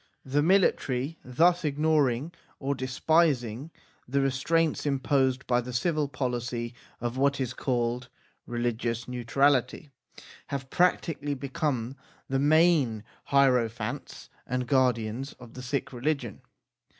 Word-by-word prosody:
The 140 +2 +1
military 160 -5 +2
thus 170 +8 +3
ignoring 150 -2 +1 0.3
or 140 +1 -1
despising 130 -1 +1 0.4
the 140 +3 0
restraints 150 +4 +1
imposed 135 -2 +1
by 120 0 +2
the 125 +1 -7
civil 150 +3 0
policy 120 -2 -3 0.3
of 120 +1 -3
what 140 +1 +2
is 130 -3 -2
called 125 -1 -1 0.4
religious 120 -1 -2
neutrality, 130 +4 +1 0.6
have 135 -1 -5
practically 160 -5 +1
become 135 -2 -2 0.3
the 135 0 0
main 145 -7 +3 0.2
hiero 130 -4 +4
phants 110 -1 -6 0.2
and 125 0 -1
guardians 125 -1 +1
of 120 -2 -14
the 130 - -8
Sikh 130 +2 -3
religion. 125 -3 -2
130 Hz, 115 wpm, -28 LUFS, 120-145 Hz, 0.6 s, hiero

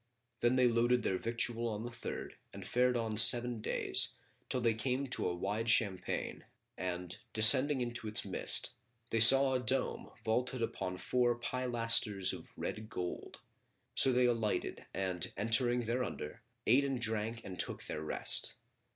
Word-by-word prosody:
Then 120 +1 +1
they 130 -1 +3
loaded 120 +1 +1
their 95 - -2
victual 115 0 -2
on 110 -1 -5
the 120 - -7
third 115 - -8 0.2
and - - -11
fared 125 0 +1
on 110 -2 -4
seven 120 +1 +6
days, - - +2 0.3
till 130 - 0
they 115 -2 0
came 125 +4 -3
to 125 - +2
a 90 - -4
wide 105 +5 -4
champaign 100 -5 -1 0.3
and, 90 -1 -6
descending 130 +5 +8
into 120 -2 -5
its 105 - -3
midst, - - 0 0.4
they 115 - 0
saw 135 +4 +6
a 130 - 0
dome 130 +2 -3 0.2
vaulted 125 +2 -2
upon 90 -4 -5
four 120 +3 0
pilasters 115 -5 +1
of - - -11
red 110 0 -6
gold; 90 -5 -7 0.5
so 135 - +5
they 125 0 +2
alighted 115 -3 -3
and 95 -2 -2
entering 120 +4 +2
thereunder, 120 -9 -5 0.2
ate 135 +3 +3
and 135 -2 -3
drank 115 0 -4
and 90 -2 -9
took - - -2
their 75 - -7
rest. 80 - 0
115 Hz, 155 wpm, -32 LUFS, 105-125 Hz, 0.5 s, descending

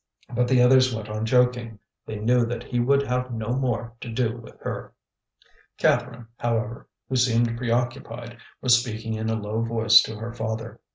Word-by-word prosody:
But 125 0 +1
the 125 -1 +4
others 130 +1 +5
went 110 -1 -6
on 110 +1 -3
joking; 125 -2 +2 0.3
they 110 - -5
knew 120 +3 +3
that 120 0 -4
he 120 -1 -2
would 140 +3 +3
have 125 -1 -2
no 110 -1 -4
more 120 -3 -1
to 120 - -6
do 115 0 0
with 115 -1 -13
her. - - -5 0.8
Catherine, 120 -1 +1
however, 115 -1 -2 0.2
who 130 - -2
seemed 120 -2 +2
preoccupied, 120 0 -3 0.2
was 120 -2 +6
speaking 110 -2 -5
in 110 0 -2
a 110 0 0
low 105 +2 -2
voice 115 -1 +5
to 110 - -5
her 115 +2 -6
father. 110 0 -4
115 Hz, 175 wpm, -25 LUFS, 110-125 Hz, 0.8 s, was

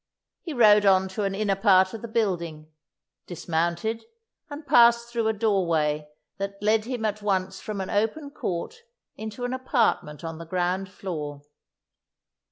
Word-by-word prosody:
He 335 - -6
rode 210 -6 +6
on 190 -1 +4
to 200 +2 -3
an 195 0 -1
inner 200 -1 0
part 190 -2 +4
of 225 - -7
the 235 - -6
building, 170 -9 -2 0.6
dismounted, 170 +6 -2 0.5
and 290 +1 -8
passed 235 -1 +5
through 235 -2 -1
a 220 - +2
doorway 170 -8 0 0.3
that 200 0 -3
led 215 +1 +2
him 245 -2 -3
at 210 0 -2
once 190 -2 -1
from 210 +1 -5
an 190 - -4
open 225 +8 -1
court 190 - -4 0.4
into 220 +3 -6
an 245 - -2
apartment 235 - 0
on 165 -1 -6
the 165 - -8
ground 185 +2 -1
floor. 150 -7 -6
200 Hz, 155 wpm, -25 LUFS, 175-225 Hz, 0.6 s, rode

